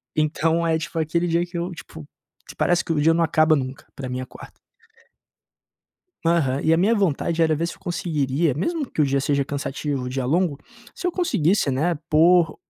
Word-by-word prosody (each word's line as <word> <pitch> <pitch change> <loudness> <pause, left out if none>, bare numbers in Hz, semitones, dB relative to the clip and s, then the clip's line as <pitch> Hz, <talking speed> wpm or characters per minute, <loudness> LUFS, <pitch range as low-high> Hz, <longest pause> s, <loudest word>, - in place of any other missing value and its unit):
Então 160 +2 +1
é 160 -1 +2
tipo 165 +1 -4
aquele 170 +2 0
dia 170 +1 +1
que 175 0 -8
eu 175 +2 -3
tipo, 160 -3 -11 0.5
parece 175 0 +1
que 165 - -1
o 150 - 0
dia 160 +2 +4
não 170 +1 +2
acaba 155 0 +3
nunca, 130 -1 -5
pra 135 - -6
mim 125 0 -4
é - - -3
a - - -8
quarta. - - -12 1.8
Aham. 145 -6 +2
E 160 - +3
a - - +5
minha 205 +6 +3
vontade 170 -4 0
era 160 -1 +3
ver 165 +3 -1
se - - -6
eu - - -23
conseguiria, 155 -5 -1
mesmo 310 - -2
que 155 - 0
o - - +4
dia 140 0 +1
seja 140 0 0
cansativo, 140 -1 -3
o - - -4
dia 130 0 -3
longo, 160 +2 +1 0.4
se 360 - -5
eu 360 - 0
conseguisse, 190 - +1
né, 155 +7 0
pôr 165 +1 +4
160 Hz, 210 wpm, -23 LUFS, 140-170 Hz, 1.8 s, a